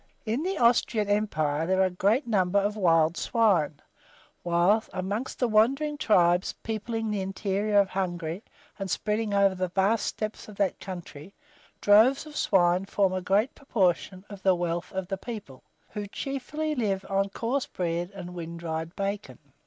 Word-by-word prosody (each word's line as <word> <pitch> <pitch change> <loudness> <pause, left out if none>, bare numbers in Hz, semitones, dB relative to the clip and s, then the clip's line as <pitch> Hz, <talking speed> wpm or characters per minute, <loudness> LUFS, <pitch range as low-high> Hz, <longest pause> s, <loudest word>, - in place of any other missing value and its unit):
In 230 +5 -1
the 380 +4 -2
Austrian 235 -3 +3
empire 160 -7 0
there 190 +1 +3
are 185 - +1
great 205 +9 +1
numbers 200 -3 +2
of 205 +1 -1
wild 165 -4 +3
swine, 180 -11 +2 0.6
while, 175 +6 +3
among 200 +7 -3
the 250 - +1
wandering 270 +8 +2
tribes 180 - +3
peopling 225 0 -3
the 205 -2 -1
interior 200 +2 -1
of 200 -1 +4
Hungary, 175 -1 -3 0.4
and 195 -1 -4
spreading 210 +3 -1
over 200 -1 +4
the 185 0 -2
vast 195 +4 +1
steppes 215 0 -4
of 210 - -11
that 195 -2 0
country, 175 -2 -9 0.5
droves 225 +8 +5
of 305 -1 -11
swine 180 -4 +3
form 195 -2 +1
a 185 - -2
great 200 +7 +1
portion 190 -6 -1
of 200 -2 -10
the 190 -1 +4
wealth 175 -1 -3
of 190 -1 -4
the 195 0 -3
people, 205 - -8 0.3
who 205 -1 -5
chiefly 280 +6 -3
live 200 -7 -1
on 195 0 +1
a - - -14
coarse 240 +6 -2
bread 175 0 -2
and 180 -2 -7
wind 170 -1 -7
dried 160 +1 -4
bacon. 200 +1 -4
195 Hz, 165 wpm, -27 LUFS, 180-220 Hz, 0.6 s, droves